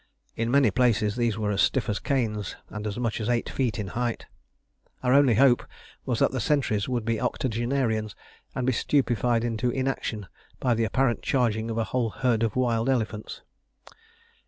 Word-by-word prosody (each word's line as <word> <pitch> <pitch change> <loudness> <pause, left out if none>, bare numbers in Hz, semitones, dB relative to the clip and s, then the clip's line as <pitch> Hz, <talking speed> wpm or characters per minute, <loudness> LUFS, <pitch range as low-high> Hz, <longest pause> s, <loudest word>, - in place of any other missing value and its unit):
In 115 +1 -1
many 135 -4 +4
places 110 -3 +2
these 120 -3 0
were 105 -1 -1
as 100 - +1
stiff 130 - +2
as 105 - -1
canes, 110 -8 -1 0.2
and 105 0 -5
as 105 - -4
much 115 -2 -2
as 110 - -2
eight 120 -1 +1
feet 125 -4 -1
in 105 -3 -4
height. 120 +1 -2 0.8
Our 125 0 +3
only 140 -4 +5
hope 125 +1 +5 0.4
was - - 0
that - - +3
the - - -2
sentries 125 -8 0
would 120 -3 -1
be 115 -1 -1
octogenarians, 120 -3 -1 0.4
and 125 - -1
be 130 - +2
stupefied 120 -3 +1
into 120 +1 -1
inaction 130 -5 -2 0.3
by 125 - +2
the 115 0 +1
apparent 120 -1 +1
charging 115 -4 0
of 115 - -3
a 115 - +2
whole 120 0 -1
herd 120 -1 0
of 115 -2 0
wild 120 -1 +1
elephants. 110 -4 -2
115 Hz, 180 wpm, -26 LUFS, 110-125 Hz, 0.8 s, only